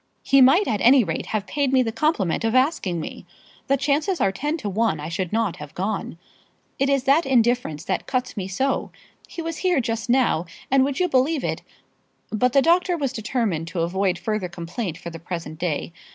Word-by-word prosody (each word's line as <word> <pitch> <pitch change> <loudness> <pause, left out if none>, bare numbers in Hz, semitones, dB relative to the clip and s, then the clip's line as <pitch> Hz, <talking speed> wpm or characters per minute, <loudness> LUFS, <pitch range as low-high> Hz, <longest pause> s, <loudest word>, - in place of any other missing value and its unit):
"He 275 -1 +5
might 275 +11 +6
at 210 -4 -1
any 255 +1 +6
rate - - -3
have 215 -2 -2
paid 285 +1 -1
me 260 -1 +4
the 225 - -2
compliment 220 - 0
of 225 +2 0
asking 255 - +1
me. 155 - -7 0.4
The 275 0 +3
chances 295 +6 0
are 195 - +2
ten 295 +10 -2
to 230 - -5
one 205 -4 0
I 150 +2 -5
should 175 +1 -3
not 220 -4 0
have 150 +1 -10
gone. 195 -3 -3 0.6
It 275 +1 +2
is 275 -2 +2
that 280 +5 +4
indifference 240 - +1
that - - -2
cuts 255 -1 -2
me 190 -4 -4
so. 265 +9 -1 0.4
He 335 - -7
was 330 -1 -4
here 360 -5 +2
just 230 0 -3
now, 240 -9 +2 0.2
and, 270 -1 +5
would 275 0 -1
you 365 - +3
believe 275 0 +1
it? - - -2 0.4
" - - -43 0.3
But 250 +3 +1
the 275 - +5
doctor 350 +1 +3
was 275 -5 -2
determined 215 -8 -2
to 165 0 -3
avoid 185 +2 0
further 200 0 -2
complaint 175 +1 -5
for 170 - -8
the 165 - -8
present 165 -2 -6
day. 170 -1 -2
230 Hz, 210 wpm, -23 LUFS, 185-275 Hz, 0.6 s, might